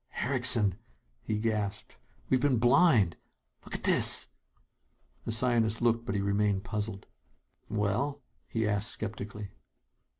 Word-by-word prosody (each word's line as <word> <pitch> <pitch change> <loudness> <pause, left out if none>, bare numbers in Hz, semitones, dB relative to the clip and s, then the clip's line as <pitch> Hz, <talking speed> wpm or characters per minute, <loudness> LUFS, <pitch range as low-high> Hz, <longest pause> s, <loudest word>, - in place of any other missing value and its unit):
"Erickson!" 120 -6 +3 0.4
he 105 - -2
gasped. 105 -1 -3 0.3
"We've 130 -1 +2
been 135 -3 +2
blind. 120 - +4 0.5
Look - - -6
at - - -5
this!" - - +3 1.0
The - - -2
scientist 115 -1 +1
looked; 115 -1 +1
but 100 - -2
he 100 - 0
remained 100 0 0
puzzled. 105 -1 -4 0.6
"Well 110 +7 -1
?" - - -48
he 110 -1 -1
asked 105 +1 0
skeptically. 105 -2 -6
110 Hz, 125 wpm, -29 LUFS, 100-120 Hz, 1.0 s, blind